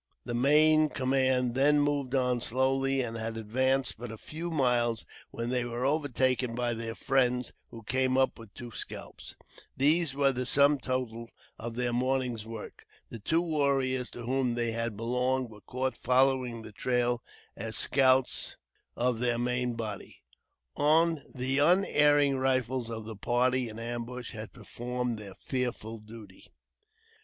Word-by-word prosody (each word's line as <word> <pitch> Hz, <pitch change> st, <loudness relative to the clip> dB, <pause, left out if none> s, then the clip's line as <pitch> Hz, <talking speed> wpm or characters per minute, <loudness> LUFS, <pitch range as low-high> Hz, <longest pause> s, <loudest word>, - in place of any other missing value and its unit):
The 120 Hz, -, -4 dB
main 155 Hz, +5 st, +5 dB
command 130 Hz, -2 st, +1 dB
then 145 Hz, +3 st, +4 dB
moved 145 Hz, -2 st, 0 dB
on 125 Hz, -2 st, +1 dB
slowly, 135 Hz, +2 st, +1 dB
and 115 Hz, -1 st, -5 dB
had 115 Hz, 0 st, -4 dB
advanced 130 Hz, +3 st, 0 dB
but 120 Hz, -1 st, -6 dB
a 110 Hz, -, -8 dB
few 165 Hz, +8 st, -6 dB
miles 120 Hz, -6 st, +1 dB, 0.2 s
when 115 Hz, +1 st, -4 dB
they 125 Hz, -1 st, +1 dB
were 120 Hz, +1 st, -3 dB
overtaken 130 Hz, -4 st, +1 dB
by 120 Hz, 0 st, 0 dB
their 115 Hz, 0 st, -5 dB
friends, 125 Hz, -2 st, +1 dB, 0.2 s
who 115 Hz, -1 st, -11 dB
came 130 Hz, +3 st, +1 dB
up 130 Hz, -2 st, +2 dB
with 115 Hz, -3 st, -12 dB
two 120 Hz, -1 st, -8 dB
scalps. -, -, -7 dB, 0.4 s
These 150 Hz, +1 st, +4 dB
were 140 Hz, -1 st, +3 dB
the 125 Hz, -1 st, -3 dB
sum 140 Hz, +1 st, +4 dB
total 120 Hz, -3 st, -3 dB, 0.3 s
of 115 Hz, 0 st, -5 dB
their 120 Hz, 0 st, -1 dB
morning's 125 Hz, -3 st, -1 dB
work. 115 Hz, -2 st, -9 dB, 0.2 s
The 115 Hz, -, -7 dB
two 165 Hz, +11 st, +1 dB
warriors 135 Hz, -5 st, 0 dB
to 120 Hz, -, -7 dB
whom 125 Hz, 0 st, 0 dB
they 120 Hz, -1 st, 0 dB
had 115 Hz, -2 st, -3 dB
belonged 125 Hz, +2 st, 0 dB
were 105 Hz, -1 st, -13 dB
caught 130 Hz, +2 st, -3 dB
following 130 Hz, -3 st, +2 dB
the 110 Hz, -, -10 dB
trail 120 Hz, +2 st, 0 dB, 0.3 s
as 110 Hz, +1 st, -4 dB
scouts 130 Hz, -1 st, +3 dB, 0.4 s
of 125 Hz, -2 st, 0 dB
their 120 Hz, -1 st, +1 dB
main 125 Hz, 0 st, -1 dB
body. 110 Hz, -3 st, -7 dB, 0.5 s
The 145 Hz, -4 st, +1 dB
unerring 145 Hz, -4 st, +4 dB
rifles 130 Hz, -2 st, 0 dB
of 110 Hz, -1 st, -5 dB
the 110 Hz, 0 st, -7 dB
party 125 Hz, +3 st, +1 dB
in 110 Hz, -, -9 dB
ambush 120 Hz, +1 st, -5 dB
had 110 Hz, -3 st, -7 dB
performed 125 Hz, +4 st, -4 dB
their 100 Hz, -3 st, -9 dB
fearful 120 Hz, -4 st, -3 dB
duty. 105 Hz, -3 st, -13 dB
125 Hz, 150 wpm, -29 LUFS, 115-135 Hz, 0.5 s, main